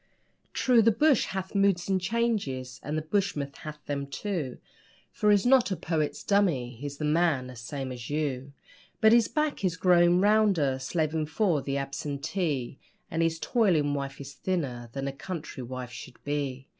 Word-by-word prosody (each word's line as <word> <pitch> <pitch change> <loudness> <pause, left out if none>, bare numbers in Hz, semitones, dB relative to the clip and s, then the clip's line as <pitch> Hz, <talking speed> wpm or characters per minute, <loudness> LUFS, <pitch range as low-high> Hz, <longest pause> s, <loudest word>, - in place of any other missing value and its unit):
True, 245 -3 +4
the 230 +1 +5
bush 280 +3 +3
'hath 190 0 -5
moods 195 -3 +2
and 190 -1 +1
changes' 180 - -1
and 150 +2 -3
the 155 - -2
bushman 155 -5 -1
hath 150 -1 -9
'em, 140 -1 -2
too, 140 -1 -3 0.5
For 210 - +1
he's 205 0 +4
not 255 -2 +5
a 190 - 0
poet's 160 -4 -2
dummy 170 -12 +2
he's 140 +4 -7
a - - -3
man, 150 -4 +2
the 125 0 -9
same 130 +3 -5
as 120 -2 -7
you; 140 -3 -2 0.5
But 220 - +6
his 235 -2 +5
back 300 -6 -1
is 180 -2 0
growing 175 -1 +5
rounder 195 -10 +3
slaving 155 +2 -1
for 165 -2 +1
the 140 0 -2
absentee 140 0 -3 0.3
And 165 - 0
his 165 0 +1
toiling 165 - +2
wife 140 -1 -4
is 140 0 -8
thinner 135 -12 -3
than 135 0 -3
a - - -1
country 160 -2 -6
wife 125 0 -6
should 120 - -10
be. 140 -2 -3
155 Hz, 170 wpm, -28 LUFS, 135-195 Hz, 0.5 s, But